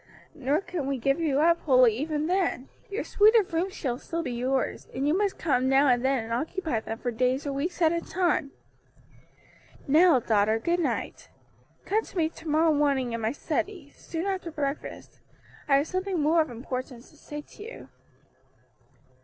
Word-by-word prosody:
Nor 290 +2 0
can 340 -8 -4
we 275 -1 -1
give 275 +5 +1
you 295 -4 +1
up 335 +1 +4
wholly 255 -6 +5
even 300 +4 -2
then; 350 -7 0 0.2
your 405 +3 -3
suite 430 +2 +4
of 405 -6 +3
rooms 370 +4 -1
shall 250 -3 -3
still 335 +2 -4
be 255 - -4
yours, 255 +2 -1
and 270 +2 0
you 305 - +3
must 400 0 0
come 260 -5 +1
now 270 +2 +4
and 245 -1 +2
then 265 -3 +1
and 225 +1 -5
occupy 315 - -2
them 225 0 -6
for 245 - -3
days 255 +4 0
or 280 - -2
weeks 335 +6 -2
at 320 - +5
a 335 - -1
time. 345 -6 0 1.4
"Now, 315 0 +6
daughter, 215 -1 +2
good 340 +10 0
night. 340 - -3 0.6
Come 435 +2 +1
to - - -11
me 320 -2 +2
to 325 0 -12
morrow 315 +1 +3
morning 275 -4 +1
in 230 - -3
my 220 +1 0
study, 305 +2 -3
soon 330 +2 -5
after 380 -3 -2
breakfast, 295 -2 -5 0.5
I 280 - +4
have 285 +3 0
something 370 -1 -2
more 315 +3 +4
of 310 - -2
importance 250 0 -6
to - - -21
say 295 0 -8
to 415 - -13
you." 460 +3 -10
295 Hz, 185 wpm, -27 LUFS, 255-340 Hz, 1.4 s, Now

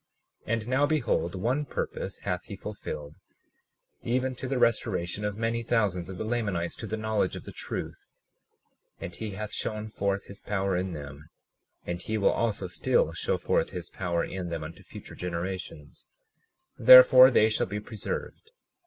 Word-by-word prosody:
37:19 - - 0
And 115 -1 -2
now 130 +3 +3
behold, 120 - 0
one 120 +10 0
purpose 100 -7 -4
hath 90 -2 -3
he 100 - -7
fulfilled, 80 -7 -7 0.8
even 130 +2 0
to 130 +1 -6
the 135 0 -1
restoration 105 -5 +1
of 105 -1 -2
many 115 +1 -1
thousands 105 -7 0
of 95 - -7
the - - -3
Lamanites 105 -7 -1
to 115 - -6
the 110 +2 -3
knowledge 110 -3 0
of - - -7
the - - -9
truth; - - -6 0.9
and 85 - -6
he 105 +2 -5
hath 105 0 -5
shown 110 0 -3
forth 100 -2 -1
his 100 +1 -12
power 100 -2 -1
in 90 0 -2
them, 75 0 -9 0.6
and 85 0 -4
he 110 +4 -2
will 100 - +3
also 110 -4 -1
still 90 - +1
show - - -1
forth - - +1
his 90 -1 -7
power 85 -2 -1
in 90 -2 -5
them 85 -2 -4
unto 80 +2 -9
future - - -11
generations; 90 -3 -6 0.7
therefore 130 0 +10
they 110 -4 +5
shall 110 - 0
be 105 +2 -3
preserved. 110 - -6
100 Hz, 170 wpm, -28 LUFS, 90-115 Hz, 0.9 s, therefore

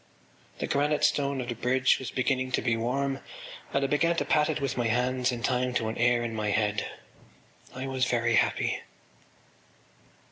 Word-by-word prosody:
The - - -2
granite 145 +1 +1
stone 140 -2 +2
of 120 - -6
the - - -1
bridge 125 +3 +2
was 130 - -5
beginning 130 0 0
to - - +1
be 120 -2 +2
warm 135 +4 -1 0.5
and 140 - +1
I - - +3
began 165 +4 +2
to - - -1
pat 150 0 +2
it 155 - -1
with 135 -3 -2
my 120 -2 0
hands 125 +2 +1
in 120 -1 -5
time 125 0 0
to 110 -2 0
an 110 - -5
air 120 0 +3
in 115 -1 -3
my 105 -1 -1
head. 105 -1 0 0.9
I 130 +1 -4
was 130 -1 0
very 120 -1 +1
happy. - - +1
125 Hz, 185 wpm, -28 LUFS, 120-135 Hz, 0.9 s, I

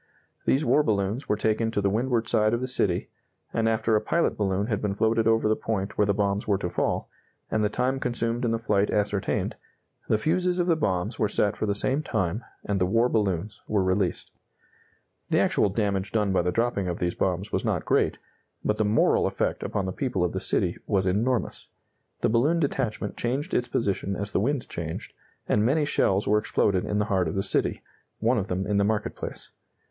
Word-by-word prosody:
These 140 +4 +2
war 150 - +4
balloons 105 0 -1
were - - +3
taken 110 +1 +1
to 110 - -1
the 100 -1 +1
windward 115 +1 0
side 110 -1 +3
of - - -2
the 130 - -2
city, 100 -8 0 0.4
and 115 0 +2
after 110 0 +1
a 105 - +3
pilot 170 - +1
balloon 100 -1 0
had 105 -3 -2
been 100 -2 -1
floated 110 +1 +2
over 115 -1 +3
the 110 - +3
point 100 -3 -3
where 105 - +2
the 100 - +3
bombs 100 0 0
were 100 -2 +3
to 90 -2 -3
fall, - - -1 0.4
and 110 - +1
the 105 - +2
time 125 +4 0
consumed 120 -1 -1
in 120 - +1
the 115 - +1
flight 105 -3 +1
ascertained, 105 -1 -1 0.5
the 110 - +4
fuses 180 +8 +1
of 175 - +2
the 170 -2 +3
bombs 95 - -1
were 105 - +2
set 100 -1 +1
for 110 - -2
the 100 - +1
same 130 +7 0
time, 110 - -2 0.2
and 100 -2 -1
the 90 - +3
war 115 +5 +3
balloons 100 -3 -1
were 105 -3 +1
released. 95 -1 0 1.0
The - - +2
actual 105 - +3
damage 100 -1 -1
done 105 -3 +1
by 95 - +3
the 90 +1 0
dropping 115 -2 0
of 90 -1 -2
these 85 0 -1
bombs 95 +2 -1
was - - 0
not - - -1
great, - - +2 0.5
but 105 - 0
the - - +4
moral 105 +2 +3
effect - - -1
upon 100 - -2
the 95 - -2
people 110 -8 -1
of 90 - 0
the - - -3
city - - 0
was 95 -2 +1
enormous. 115 +6 0 0.5
The - - +2
balloon 140 +10 +3
detachment 120 -8 -2
changed 135 +8 -2
its 120 - +1
position 100 -4 -1
as 100 +2 -4
the - - +1
wind 130 +5 0
changed, 80 -1 -6 0.3
and 105 - +2
many 145 +6 +2
shells 100 -8 +1
were 105 +1 +4
exploded 100 -3 +1
in 105 - -1
the 105 - +1
heart 95 -4 +1
of 80 - -3
the 95 - 0
city, - - 0 0.4
one 115 +2 +2
of 100 - -3
them 95 -1 -2
in 100 0 0
the 100 - +3
market 105 +1 -1
place. - - -7
105 Hz, 215 wpm, -26 LUFS, 100-115 Hz, 1.0 s, war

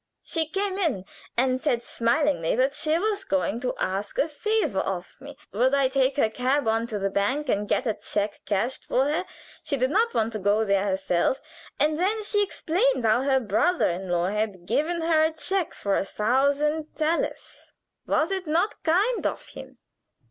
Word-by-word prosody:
She 320 -2 -1
came 390 +3 -2
in 270 - 0 0.3
and 255 +1 +2
said 240 -6 0
smilingly 240 - +1
that 260 +3 +2
she 310 +2 +1
was 410 +1 -1
going 195 - 0
to 250 0 -2
ask 195 +2 -2
a 295 - +2
favor 425 - 0
of 180 -2 -4
me. 285 0 -10 0.2
Would 255 +6 +3
I 275 -2 +3
take 265 +1 +1
her 275 - +4
cab 255 +4 0
on 225 +1 +1
to 215 - -3
the 195 -1 -1
bank 255 +9 0
and 205 -1 0
get 255 - +1
a 220 - +1
check 205 0 -3
cashed 220 +6 -1
for 260 - +1
her? 315 +6 0 0.4
She 280 - -2
did 255 +1 +1
not 460 +5 +2
want 225 +1 +1
to 215 - -3
go 205 +3 +2
there 200 -1 +2
herself. 190 +5 0 0.4
And 305 +1 +2
then 425 +4 0
she 415 0 +2
explained 395 - 0
how 220 +3 +4
her 270 -1 +2
brother 235 - +1
in 185 +2 -5
law 175 +1 +1
had 205 -4 -2
given 310 - 0
her 320 -1 +3
a 315 - -1
check 360 +3 -1
for 200 -1 -1
a - - +1
thousand 280 +9 0
thalers 315 +2 -2 0.4
was 315 +4 +1
it 380 -3 -3
not 335 +7 0
kind 395 +9 +2
of - - -6
him? - - -11
265 Hz, 190 wpm, -25 LUFS, 210-320 Hz, 0.4 s, her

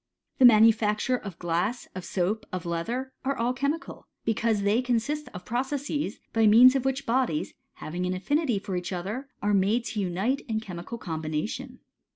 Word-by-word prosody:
The 260 - +8
manufacture 225 +1 +5
of 200 -8 -7
glass, 175 +8 -1
of 185 - -6
soap, 195 +5 -1
of 185 -1 -4
leather, 230 +11 -3
are 275 +1 -1
all 240 +2 +1
chemical, 280 +5 -3 0.2
because 225 -2 +1
they 210 +4 +3
consist 255 +5 -1
of 180 0 -9
processes, 270 0 -2
by 225 -1 +4
means 245 +5 +8
of 265 -1 0
which 270 +1 -1
bodies, 235 -10 0 0.2
having 180 +3 -4
an 185 - -1
affinity 285 - 0
for 195 -1 -4
each 180 +1 -3
other, 205 +10 -4
are 205 0 +2
made 205 +5 +2
to 215 - -3
unite 195 +8 0
in 220 -2 -1
chemical 190 +1 -7
combination. 165 - -4
225 Hz, 170 wpm, -27 LUFS, 185-255 Hz, 0.2 s, The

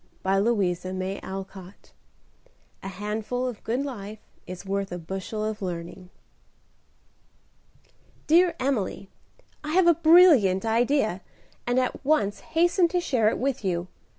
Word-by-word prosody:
A - - -1
COUNTRY 205 -5 +2
CHRISTMAS 190 +1 -7 0.9
"A - - -7
handful 210 +5 -3
of 245 -4 -7
good 245 +5 -1
life 215 -6 -7 0.3
is 185 +1 -8
worth 195 0 -2
a 175 - -4
bushel 190 +5 -5
of 215 0 -4
learning." 180 0 -6 2.2
"Dear 345 +3 +4
Emily, 240 -7 -2 0.5
I 305 +1 -4
have 370 0 +4
a 340 - +6
brilliant 310 - +5
idea, 225 -3 +1 0.5
and 245 +1 +2
at 255 +2 -2
once 260 -9 +1
hasten 345 +2 +2
to 355 +2 -1
share 250 -11 +2
it - - -2
with 265 -3 -2
you. 180 -1 -2
215 Hz, 125 wpm, -25 LUFS, 190-275 Hz, 2.2 s, a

